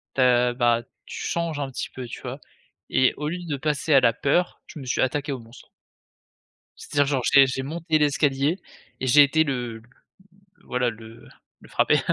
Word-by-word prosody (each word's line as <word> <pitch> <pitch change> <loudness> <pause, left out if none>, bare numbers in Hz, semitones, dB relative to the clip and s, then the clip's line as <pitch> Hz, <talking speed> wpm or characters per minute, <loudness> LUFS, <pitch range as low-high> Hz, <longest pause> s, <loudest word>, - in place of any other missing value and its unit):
tu 135 - +1
as 125 -1 +4
bah 120 -1 +2 0.2
tu - - -8
changes 170 -3 -2
un 140 - -3
petit 130 - -5
peu, 130 - -8
tu 115 - -8
vois? 130 +2 -6 0.5
Et 130 - +3
au 150 - -3
lieu 175 +2 -5
de 145 -4 -3
passer 150 +2 0
à 135 - +8
la 115 - +3
peur, 160 +8 0
je - - -10
me 135 - -8
suis 125 - 0
attaqué 140 +2 -1
au 130 - -5
monstre. 115 +2 -15 1.1
C'est-à-dire, 145 -1 0
genre, 135 -2 0
j'ai 140 -1 +8
j'ai 130 0 -3
monté 160 +2 -1
l'escalier 145 +3 +1 0.4
et 130 - -2
j'ai 145 +3 +8
été 160 +3 +3
le 120 -6 -4 0.8
voilà, 125 -1 0
le 110 0 -13 0.3
le - - -16
frapper. - - +2
135 Hz, 190 wpm, -24 LUFS, 125-150 Hz, 1.1 s, à